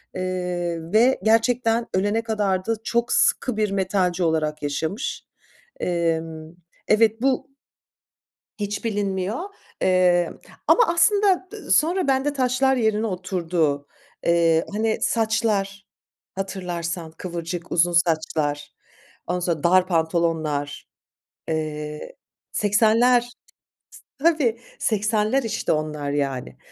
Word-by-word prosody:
eee, 180 -2 -2
ve 245 +4 +4
gerçekten 230 +1 +2
ölene 205 +4 +1
kadar 205 -5 -1
da 225 - 0
çok 235 +1 0
sıkı 245 -4 +2
bir 210 -2 +1
metalci 185 -2 0
olarak 155 -2 0
yaşamış. 160 - -3 0.6
Emm, 165 -2 -2 0.4
evet, 220 +1 +3
bu 265 0 +1 1.1
hiç 205 +2 -3
bilinmiyor, 200 - -1 0.4
emm, 180 -2 +3 0.3
ama 485 - +6
aslında 370 +2 +3
dı - - -9
sonra 340 +1 +2
bende 270 +2 +2
taşlar 265 0 +2
yerine 220 -1 +1
oturdu. 175 -6 -1 0.4
Eee, 165 -1 +3
hani 220 +1 0
saçlar, 210 -3 0 0.5
hatırlarsan 175 -3 -4
kıvırcık, 170 0 -6
uzun 175 +1 +3
saçlar, 155 -4 0 0.5
ondan 180 +1 -1
sonra 170 -4 -1
dar 185 +1 +5
pantolonlar, 160 -4 -1 0.6
eee, 155 - -4 0.4
80'ler, 230 +4 +3 0.9
tabii, 275 -7 +2 0.2
80'ler, 215 +4 +1
işte, 225 - -2
onlar 150 -2 -2
yani. 135 -3 -3
185 Hz, 100 wpm, -23 LUFS, 165-225 Hz, 1.1 s, ama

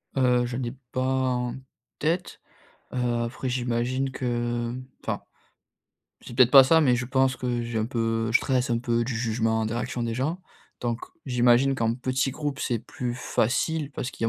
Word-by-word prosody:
Heu, 125 -2 +3
j'en 125 +1 -3
ai 120 +1 -3 0.2
pas 130 - -1
en 130 -2 0 0.4
tête, 170 +4 -1 0.5
heu, 120 -2 0
après, 125 +2 -4
j'imagine 125 +2 -1
que, 130 - -5 0.5
mmh, 130 +1 -7 0.2
enfin, - - -2 1.0
c'est 120 - -10
peut-être 125 -1 +6
pas 135 -1 +10
ça, 160 +4 +5
mais 125 -5 +4
je 120 - -2
pense 130 0 +2
que, 120 -1 -2
j'ai 115 -1 -3
un 110 - 0
peu 115 -2 -1
je - - +6
stresse 130 -1 0
un 115 - +2
peu 120 -1 0
du 125 -1 -3
jugement, 110 -1 0
des 115 - -3
réactions 120 0 -3
des 115 -1 -2
gens. 155 +9 -1 0.4
Donc, 120 -1 -1 0.3
j'imagine 125 +2 +4
qu'en 115 -2 0
petit 130 +1 0
groupe, 145 0 -4
c'est 120 - -1
plus 120 +2 -5
facile, 145 +5 0
parce 125 - -4
qu'il 115 - -5
y - - +3
125 Hz, 185 wpm, -26 LUFS, 120-130 Hz, 1.0 s, pas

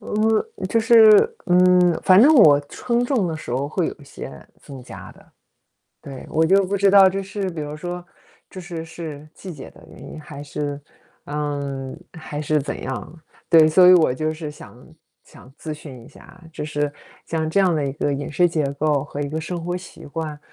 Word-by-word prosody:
嗯， 220 - -1
就 230 - +1
是， 225 - +6
嗯， 180 -1 +4
反 185 +1 +6
正 295 +5 +6
我 155 - +7
秤 240 0 -1
重 245 -7 0
的 165 -2 -3
时 155 - -9
候 135 +4 -2
会 170 +2 -1
有 - - -6
一 145 - -17
些 140 - -9 0.3
增 135 -3 -11
加 - - -11
的。 - - -22 0.7
对， 135 -2 -10
我 160 +1 +2
就 195 +3 +4
不 195 +2 -2
知 200 0 +3
道 195 -1 +7
这 195 +1 -3
是 195 0 -4
比 165 -3 -7
如 150 0 -6
说 175 +2 -6 0.5
这 - - -11
是 170 -2 -7
是 160 -2 -9
季 185 - -9
节 145 -5 -10
的 - - -18
原 - - -15
因？ - - -9
还 150 -1 -11
是， 145 0 -5 0.5
嗯， 140 -2 -4
还 160 -3 -7
是 150 0 0
怎 140 - -5
样？ 130 +6 -7 0.3
对， 160 -2 +6
所 180 +3 +5
以 - - +9
我 160 -7 +3
就 155 +4 -2
是 155 -1 -7
想 125 -4 -15 0.4
想 130 - -17
咨 155 -1 -6
询 135 -6 -12
一 - - -15
下， 180 - -17
就 155 - -6
是 145 -1 -2 0.4
像 160 -1 -2
这 180 - +1
样 185 -3 +3
的 150 -2 -1
一 135 - -3
个 145 0 -1
饮 140 +1 -4
食 175 +4 +2
结 160 -3 -1
构 145 -1 0
和 145 0 -7
一 145 - -3
个 155 +2 -4
生 170 +2 -5
活 175 +1 -3
习 180 - -11
惯， 155 0 -6
160 Hz, 220 characters per minute, -21 LUFS, 145-185 Hz, 0.7 s, 以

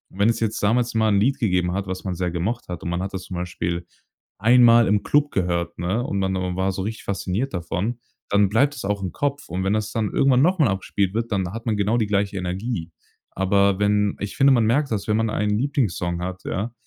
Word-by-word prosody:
Wenn 100 +3 +3
es 115 - 0
jetzt 110 -1 -1
damals 115 +4 +1
mal 110 -1 +2
'n 100 -1 +3
Lied 135 +5 +1
gegeben 90 -6 +1
hat, 100 +1 -3
was 95 0 -5
man 95 - -3
sehr 90 0 -1
gemocht 100 +8 -3
hat 90 0 -6
und 85 - -3
man 85 +1 -2
hat 95 +1 -4
das 95 -1 -4
zum 95 - -7
Beispiel 85 -1 -3 0.5
einmal 120 +1 +6
im 105 +1 +2
Club 145 0 +2
gehört, 85 -2 -1
ne, 95 +8 -1
und 100 -6 -2
man 95 0 0
o 90 -1 -2
war 95 +1 +1
so 95 - -4
richtig 110 +2 -5
fasziniert 100 +6 -2
davon, 90 +7 -3 0.3
dann 100 -1 +3
bleibt 140 +7 +2
das - - -7
auch 100 0 -1
im 90 - -3
Kopf. 145 0 -2
Und 90 +2 -2
wenn 95 +2 +1
das 110 0 -1
dann 110 -2 -1
irgendwann 135 -1 +3
noch 185 +4 +3
mal 145 - +5
abspielt 95 0 -1
wird, 115 0 -2
dann 95 -3 0
hat 115 +1 -7
man 110 -3 0
genau 105 +4 +1
die 110 -3 +1
gleiche 100 -1 0
Energie. 90 -1 -3 0.4
Aber 100 +1 +2
wenn 105 0 +2
ich 100 0 -5
finde, 135 0 +6
man 120 -3 +3
merkt 135 +4 +1
das, 105 -1 -2
wenn 105 0 +2
man 115 -1 +1
einen 105 0 0
Lieblingssong 100 -10 -1
hat, 95 +1 -5
ja, 110 +5 -3
100 Hz, 240 wpm, -23 LUFS, 95-115 Hz, 0.5 s, einmal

